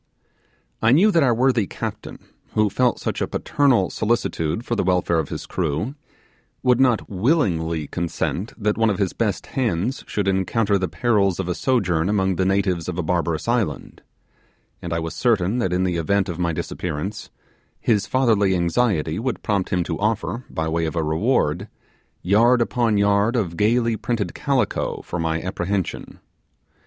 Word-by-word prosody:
I 110 - +4
knew 195 +9 +5
that 170 - +3
our 125 -5 +3
worthy 125 -4 +2
captain, - - -6 0.4
who 110 -2 +2
felt, 125 +2 +1
such - - -3
a - - 0
paternal 135 -9 +1
solicitude 110 -3 -1
for 120 - -1
the - - 0
welfare 90 -2 +1
of 80 - -3
his - - -5
crew, 80 - -2 0.7
would 125 -1 +3
not 125 -4 +3
willingly 90 - 0
consent 85 - -3
that 105 0 -1
one 115 -1 +4
of 100 - 0
his 100 -3 0
best 110 -4 -1
hands 120 -1 -1
should 105 -2 -2
encounter 100 +2 +1
the 95 - -1
perils 100 -2 +1
of 95 - -2
a 90 - 0
sojourn 90 -9 +1
among 95 -3 +1
the 95 - +1
natives 95 -3 0
of 90 - -4
a 90 - -1
barbarous 85 0 -1
island; 115 - -2 0.8
and 85 - -6
I 85 - 0
was 80 0 -3
certain 110 -2 +1
that 95 -7 0
in 90 +1 +1
the 90 -2 0
event 100 +4 +1
of 85 - -5
my 85 -1 +1
disappearance, 90 +5 -4 0.5
his 105 -4 +1
fatherly 110 -7 +2
anxiety 85 -2 +1
would 125 +2 -3
prompt 100 -3 0
him 90 -2 +1
to 85 -1 -4
offer, 115 +3 -1
by 80 0 -2
way 80 +1 0
of 80 - -5
a 80 - 0
reward, 85 - 0 0.6
yard 115 +7 +4
upon 120 -2 +1
yard 100 +3 +2
of 95 -8 -1
gaily 115 +3 +2
printed 110 -4 -2
calico 135 -7 -1
for 90 - -5
my 80 0 0
apprehension. 95 +1 -3
100 Hz, 170 wpm, -22 LUFS, 85-115 Hz, 0.8 s, knew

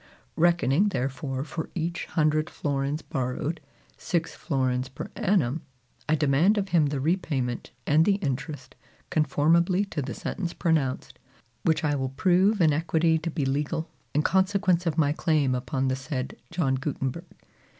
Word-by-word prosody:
Reckoning 175 +2 +3
therefore 135 -3 -2
for 160 +2 -5
each 170 0 -2
hundred 155 0 +1
florins 140 +1 -2
borrowed, 135 +3 -3 0.4
six 170 -3 -1
florins 130 -3 -1
per 130 - -7
annum, 165 -7 +1 0.5
I 155 - +4
demand 155 +8 +3
of 195 -1 -1
him 165 -4 +4
the 140 -1 -2
repayment, 140 -6 -1 0.2
and 155 +2 +4
the 195 +3 +3
interest, 140 -5 -4 0.4
conformably 165 +6 +3
to 150 - -2
the 130 -2 -5
sentence 175 -4 -4
pronounced, 155 -7 -1 0.4
which 160 -1 +2
I 150 -1 +2
will 135 -2 -1
prove 185 +8 +3
in 155 -3 +5
equity 160 +1 +2
to 165 +2 -3
be 155 -3 -2
legal, 150 +4 -1 0.2
in 150 - +3
consequence 190 -2 +2
of 160 -1 0
my 145 -3 +3
claim 155 -5 +1
upon 130 +1 -1
the 130 - +1
said 130 -1 -4
John 155 -7 0
Gutenberg. 135 +3 -3
155 Hz, 150 wpm, -26 LUFS, 135-170 Hz, 0.5 s, in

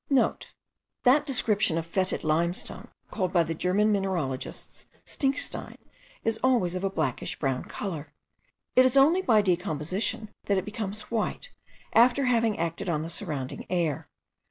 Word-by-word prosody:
* 275 -3 0
(* - - -59
That 285 +4 +4
description 215 - +1
of 165 - -2
fetid 185 +2 -1
limestone 170 +3 0 0.2
called 185 -4 -1
by 175 -2 +4
the 165 0 -3
German 190 +6 +2
mineralogists 180 -10 -3 0.2
stinkstein 275 -1 -2 0.5
is 225 0 0
always 235 -9 +3
of 185 +1 -3
a 195 - +1
blackish 155 -9 -2
brown 135 -3 -1
colour. 165 -7 -5 0.6
It 255 - +8
is 255 +1 +3
only 315 +7 +6
by 220 - +4
decomposition 185 +5 -1 0.2
that 200 - +2
it 190 - -1
becomes 210 0 -5
white, 235 - -2 0.4
after 250 +4 +5
having 230 -4 +2
acted 170 +2 -2
on 155 -2 0
the 165 - -5
surrounding 145 -7 -4
air. 170 -6 -1
195 Hz, 150 wpm, -27 LUFS, 165-230 Hz, 0.6 s, It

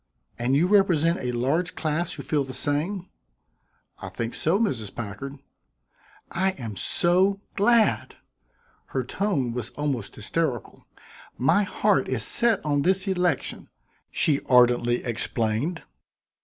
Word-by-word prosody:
"And 125 +3 +1
you 155 +5 +4
represent 180 -4 +3
a 125 - -2
large 140 +9 0
class 160 +2 -2
who 140 - -7
feel 150 -2 0
the 130 -1 -7
same?" 165 +8 -1 0.9
"I - - -7
think 115 0 -4
so, 165 +5 +1
Mrs. 115 - -2
Packard." 135 +6 -6 0.9
"I 190 +2 0
am 115 - -7
so 185 - +2 0.2
glad!" 225 +2 +2 0.7
Her - - -2
tone 145 - -1
was 120 -1 -4
almost 140 -8 -3
hysterical. 125 +3 -3 0.5
"My 135 +11 +3
heart 200 -5 +1
is 125 -4 0
set 230 - +3
on 145 -1 +1
this 190 +4 +2
election," 180 -6 -1 0.4
she 145 -3 +2
ardently 120 -1 +4
explained. 115 +6 -2
150 Hz, 125 wpm, -25 LUFS, 125-185 Hz, 0.9 s, you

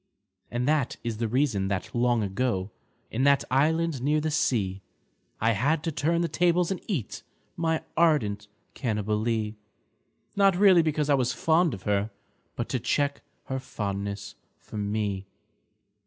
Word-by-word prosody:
And 120 +2 -2
that 150 -4 +1
is 115 -2 -3
the 115 0 -1
reason 120 -5 +1
that 95 -2 -3
long 120 -2 +2
ago. 100 -1 -1 0.4
In 115 - -1
that 140 -1 +4
island 155 +1 +2
near 150 +3 +2
the 155 +1 -1
sea, 100 -10 0 0.6
I 115 +2 +3
had 145 +9 +1
to 165 - -1
turn 165 +3 +1
the 170 - +1
tables 175 +1 +2
and 190 - -3
eat 160 - -3 0.3
My 160 -1 0
ardent 115 -12 +2 0.3
Cannibalee 110 -1 -1 0.4
— - - -44
Not 195 -2 +4
really 190 -3 +7
because 155 -2 0
I 145 - +4
was 130 -3 +2
fond 165 -3 +2
of 95 - -13
her, 105 +1 0 0.5
But - - -3
to - - 0
check 140 -1 0 0.2
her 130 0 -3
fondness 100 -4 -4 0.2
for - - -10
me. 100 -2 -2
125 Hz, 155 wpm, -27 LUFS, 105-155 Hz, 0.6 s, really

